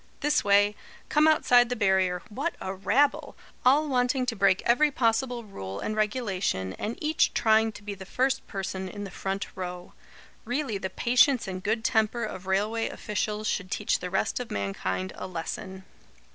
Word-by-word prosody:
This 295 +1 +2
way. 205 +1 +4 0.3
Come 305 +1 +4
outside 245 -6 +5
the 245 - -1
barrier. 190 -4 +1
What 280 +10 -3
a 190 - -4
rabble! 245 +9 +1 0.3
All 285 +5 +4
wanting 255 -1 +1
to 245 -2 -2
break 195 -2 +3
every 295 +6 +4
possible 240 -1 0
rule 100 - -7
and 215 - -3
regulation, 200 - -1
and 225 +3 -3
each 310 +1 +1
trying 220 0 +3
to 210 - -12
be 205 0 -5
the 195 -1 -9
first 265 +4 0
person 190 -1 -4
in 205 +2 -7
the 195 - -7
front 195 +2 -3
row. 180 -1 -6 0.5
Really 245 -3 -2
the 190 - -3
patience 250 +4 +3
and 185 -1 -5
good 220 +3 -1
temper 220 +1 +1
of 190 -4 -6
railway 210 +4 0
officials 210 0 -3
should 185 -2 -2
teach 205 - 0
the 180 - -5
rest 190 +6 0
of 245 - -5
mankind 95 -2 -3
a - - -6
lesson." 190 +2 -6
210 Hz, 175 wpm, -27 LUFS, 190-245 Hz, 0.5 s, outside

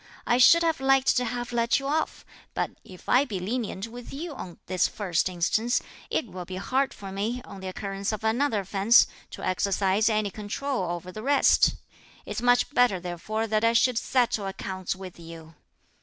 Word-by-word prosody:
I 240 - +2
should 335 +7 +7
have 325 -3 +1
liked 270 0 +3
to 250 - +1
have 240 +1 -4
let 235 +2 +2
you 275 - -7
off, 305 +3 -1 0.3
but - - -1
if 185 -1 -14
I 255 +3 +5
be 215 -9 -4
lenient 210 0 -3
with 240 +1 -10
you 315 +3 -5
on 180 -10 -8
this 185 0 +1
first 185 -4 -1
instance, 215 +7 +1 0.3
it - - 0
will 185 -4 -8
be 185 +1 -7
hard 260 +8 0
for 195 -1 -9
me, 215 +6 -2
on 195 - -10
the 190 - -6
occurrence 195 +2 -3
of 215 -1 -5
another 225 0 +1
offence, 195 +5 +5 0.2
to - - -7
exercise 195 +3 +1
any 215 -2 0
control 210 0 -3
over 175 +1 -5
the 215 - -7
rest. 280 +4 +4 0.5
It's - - -4
much 245 +3 +3
better 245 -8 +3
therefore 180 +5 -3
that 215 0 0
I 230 0 +4
should 235 0 +3
settle 235 -6 0
accounts 190 -1 -4
with 185 -2 -10
you." 165 -1 -11
215 Hz, 185 wpm, -26 LUFS, 190-245 Hz, 0.5 s, should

